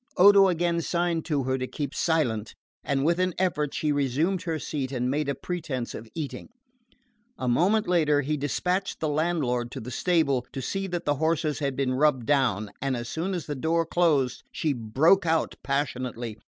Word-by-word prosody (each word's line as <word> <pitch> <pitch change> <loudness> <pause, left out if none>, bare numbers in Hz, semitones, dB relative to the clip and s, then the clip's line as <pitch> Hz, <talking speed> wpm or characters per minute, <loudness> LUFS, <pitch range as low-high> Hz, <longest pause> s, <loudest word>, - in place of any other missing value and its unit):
Odo 195 +1 +8
again 170 -1 +1
signed 170 -1 -1
to 145 -5 0
her 130 +1 -1
to 130 - -2
keep 145 0 -4
silent, 120 -10 0 0.3
and 140 0 0
with 170 +2 +2
an 185 -1 +1
effort 150 -6 0
she 150 - 0
resumed 145 +6 0
her 165 -2 -2
seat 140 -3 -4
and 125 -1 -1
made 145 0 -1
a 140 - 0
pretence 155 -8 -4
of 110 +1 -8
eating. 155 -4 -5 0.9
A 130 - -3
moment 195 - +2
later 155 -5 +3
he 150 +2 -1
despatched 180 +6 -1
the 160 - -1
landlord 145 -6 0
to - - -5
the 125 +3 -7
stable, 140 -7 +1
to - - -4
see 195 +8 -3
that 175 -2 -4
the 145 -1 +1
horses 160 0 0
had 140 -3 -1
been 130 -1 0
rubbed 135 -3 +2
down; 115 -7 +1
and 135 -2 0
as 120 0 -5
soon 180 +4 -2
as 175 - -4
the 150 - -3
door 165 +4 0
closed 155 -7 +1
she 155 -3 0
broke 140 - +3
out 160 0 +1
passionately. 125 -5 -3
150 Hz, 190 wpm, -26 LUFS, 130-170 Hz, 0.9 s, Odo